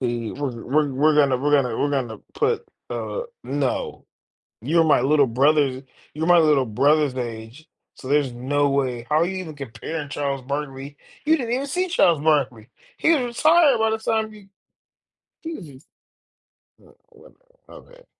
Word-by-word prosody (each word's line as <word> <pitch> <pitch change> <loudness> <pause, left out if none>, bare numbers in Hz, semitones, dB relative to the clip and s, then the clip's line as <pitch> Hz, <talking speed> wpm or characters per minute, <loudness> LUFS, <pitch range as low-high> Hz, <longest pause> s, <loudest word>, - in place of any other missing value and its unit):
We 120 -3 -3
we're 130 -5 -5
we're 145 +1 +1
we're 150 +3 +3
gonna 140 -3 +4
we're 145 +3 -1
gonna 125 -5 +2
we're 145 - 0
gonna 125 -6 -2 0.2
put, 455 0 0 0.2
uh 485 - -4 0.2
no, 140 -2 -3 0.6
you're 165 +8 +2
my 150 - +4
little 140 +1 +3
brother's 135 +1 +2 0.3
you're 160 +2 -3
my 175 0 +6
little 150 -5 +4
brother's 140 +4 +2
age, 120 +5 -7 0.3
so 130 - -11
there's 140 -2 +1
no 140 +4 0
way 130 -4 -1
how 150 - +2
are 165 - +3
you 190 +1 -4
even 165 -5 -7
comparing 145 +3 -6
Charles 140 -2 -3
Barkley? 140 +1 -5 0.3
You 315 +2 +4
didn't 240 -3 -3
even 275 +3 -2
see 365 +6 -1
Charles 170 - +3
Barkley. 135 -7 0 0.3
He 325 - +3
was 290 -6 +2
retired 310 -2 +5
by 220 - +2
the 220 - 0
time 220 -1 -1
you 210 -2 -15 1.0
Jesus 170 - -9 1.0
Uh, - - -20 0.2
well, - - -19 0.3
my - - -12
bad. - - -20
145 Hz, 165 wpm, -22 LUFS, 130-175 Hz, 1.0 s, my